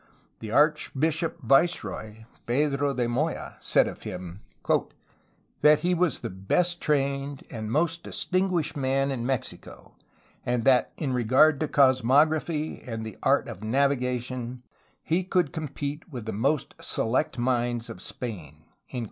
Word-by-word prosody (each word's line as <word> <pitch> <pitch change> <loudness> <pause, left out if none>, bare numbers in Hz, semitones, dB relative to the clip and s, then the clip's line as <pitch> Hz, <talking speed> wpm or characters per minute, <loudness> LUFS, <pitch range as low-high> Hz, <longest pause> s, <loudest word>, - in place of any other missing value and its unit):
The 110 - -7
archbishop 155 +4 +1
viceroy, 110 - +1 0.2
Pedro 140 +2 +1
de 120 -1 0
Moya, 145 +8 -2
said - - +3
of - - -7
him 90 +1 -7 0.6
" - - -38
that 150 0 +6
he 180 +2 +2
was 175 -2 +1
the - - -4
best 170 - 0
trained 140 -1 -1
and 110 -2 -5
most 165 +4 +1
distinguished 185 -4 -1
man 135 0 +1
in 120 -2 -3
Mexico, 135 -2 -5 0.5
and 120 -1 0
that 130 -1 +4
in 140 -5 -2
regard 130 +5 +4
to 155 - 0
cosmography 145 +4 +2
and 115 -2 -6
the 110 -4 -7
art - - +2
of - - -7
navi 135 +5 +1
gation 125 0 -4 0.4
he 170 +4 +1
could 180 -4 0
compete 150 +1 -5
with 120 -5 -6
the 110 - -4
most 135 +7 0
select 130 +7 0
minds 120 -1 0
of 90 - -9
Spain." 80 - -7
135 Hz, 140 wpm, -26 LUFS, 120-155 Hz, 0.6 s, that